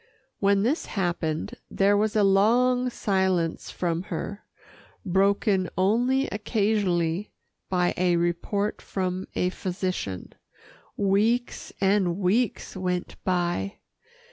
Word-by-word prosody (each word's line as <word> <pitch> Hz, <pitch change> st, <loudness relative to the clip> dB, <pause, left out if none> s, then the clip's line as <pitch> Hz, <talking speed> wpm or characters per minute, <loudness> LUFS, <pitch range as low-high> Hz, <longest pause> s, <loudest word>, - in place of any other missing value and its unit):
When 200 Hz, 0 st, +3 dB
this 275 Hz, +9 st, 0 dB
happened, 175 Hz, 0 st, -2 dB, 0.2 s
there 200 Hz, +1 st, +3 dB
was 215 Hz, +2 st, +1 dB
a 210 Hz, -, +4 dB
long 245 Hz, +6 st, +3 dB
silence 190 Hz, -7 st, 0 dB
from 170 Hz, -2 st, -1 dB
her, 200 Hz, +3 st, -5 dB, 0.6 s
broken 195 Hz, 0 st, +2 dB
only 245 Hz, +8 st, +2 dB
occasionally 205 Hz, -4 st, 0 dB, 0.4 s
by 180 Hz, -1 st, +1 dB
a 180 Hz, -1 st, +2 dB
report 175 Hz, +5 st, -1 dB
from 185 Hz, -1 st, -3 dB
a 180 Hz, -, +1 dB
physician. 185 Hz, -, -4 dB, 0.6 s
Weeks 215 Hz, +5 st, +1 dB
and 190 Hz, -3 st, +2 dB
weeks 205 Hz, +4 st, 0 dB
went 180 Hz, -1 st, -2 dB
by. 175 Hz, -, -1 dB
195 Hz, 100 wpm, -26 LUFS, 180-210 Hz, 0.6 s, a